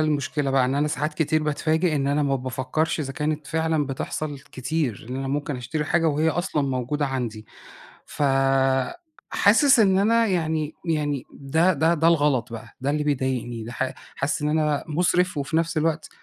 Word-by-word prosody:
المشكلة 145 -2 0
بقى 135 -1 +3
إن 130 +2 0
أنا 150 +1 +1
ساعات 150 +2 -2
كتير 155 -1 +1
باتفاجئ 155 +2 +1
إن 135 -1 0
أنا 145 +1 +1
ما 140 -1 +1
بافكرش 130 +5 -2
إذا 135 -2 -4
كانت 150 +1 -2
فعلًا 160 -2 0
بتحصل 145 +2 -4
كتير، 135 -4 -3
إن 130 - -3
أنا 135 0 -3
ممكن 145 -1 -2
أشتري 130 +5 -3
حاجة 165 +2 +2
وهي 155 +2 +1
أصلًا 170 -2 -1
موجودة 135 +3 -1
عندي 120 -5 -4 0.6
فحاسس 140 - +2
إن 190 -3 +4
أنا 230 +3 +3
يعني 160 -4 -1
يعني 145 -4 -1
ده 160 +7 +2
ده 160 +3 +2
ده 165 0 +2
الغلط 145 -8 +2
بقى 115 0 -7
ده 135 - -1
اللي 150 +1 0
بيضايقني 130 -5 -2
ده 115 - -7
ح 130 +1 -2 0.2
حاسس 140 +2 -1
إن 150 - 0
أنا 150 -2 +1
مُسرِف 180 +2 +1
وفي 145 +3 -1
نفس 165 0 0
الوقت 160 0 0
150 Hz, 175 wpm, -24 LUFS, 135-160 Hz, 0.6 s, إن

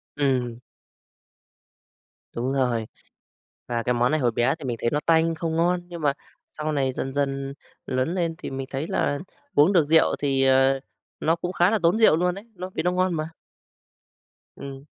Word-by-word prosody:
Ừm. 125 -4 0 1.7
Đúng 125 +3 -2
rồi, 125 -4 +1 0.8
và 120 -1 -1
cái 125 - +1
món 120 +2 +2
này 155 - +2
hồi 120 -3 +2
bé 120 +6 +1
thì 140 - -8
mình 120 -2 -2
thấy 115 - +1
nó 150 - +1
tanh 165 0 +3
không 160 0 -2
ngon, 175 +2 +2
nhưng 170 -2 -8
mà 145 -2 +2 0.4
sau 155 0 -2
này 135 -3 0
dần 135 +1 -4
dần 140 -1 -2 0.3
lớn 130 +7 -1
lên 165 -2 -1
thì - - -6
mình 135 0 -5
thấy 140 +4 -3
là 145 0 0 0.4
uống 155 +7 +5
được 165 -5 +4
rượu 160 +2 +4
thì, 135 -2 +1
à, 135 0 +4 0.4
nó 165 +2 +2
cũng 175 +2 -4
khá 175 +4 +3
là 220 - +2
tốn 175 +6 +4
rượu 190 -8 +6
luôn 180 +1 +1
đấy, 200 +3 -10
nó 185 +1 -6
vì 160 - -1
nó 180 - +2
ngon 185 0 +1
mà. 155 0 -3 1.3
Ừm. 135 0 -8
145 Hz, 190 wpm, -24 LUFS, 135-165 Hz, 1.7 s, rượu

